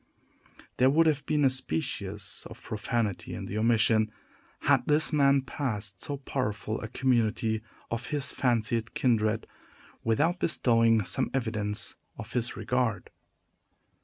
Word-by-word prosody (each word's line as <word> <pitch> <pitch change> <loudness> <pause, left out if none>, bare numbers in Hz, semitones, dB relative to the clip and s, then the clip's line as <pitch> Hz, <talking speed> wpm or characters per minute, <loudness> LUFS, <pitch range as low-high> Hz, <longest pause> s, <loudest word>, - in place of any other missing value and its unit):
There 130 +1 +5
would 160 +4 +4
have 150 -3 +2
been 150 -2 +2
a - - +6
species 105 - -3
of - - -13
profanity 105 -1 -2
in - - -6
the 105 - -3
omission, 110 -1 +3 0.5
had - - +3
this 150 +2 +3
man 140 -2 +4
passed 105 - -3
so 145 - -3
powerful 110 -6 -3
a 110 - -4
community 115 -3 +1 0.3
of 115 +1 -3
his 140 -3 -1
fancied 115 -2 0
kindred, 110 -3 +1 0.6
without 155 - +1
bestowing 115 -8 +3
some - - +1
evidence 110 -5 -1 0.2
of 110 - -8
his 125 -1 -1
regard. 115 -4 -1
115 Hz, 130 wpm, -28 LUFS, 110-135 Hz, 0.6 s, a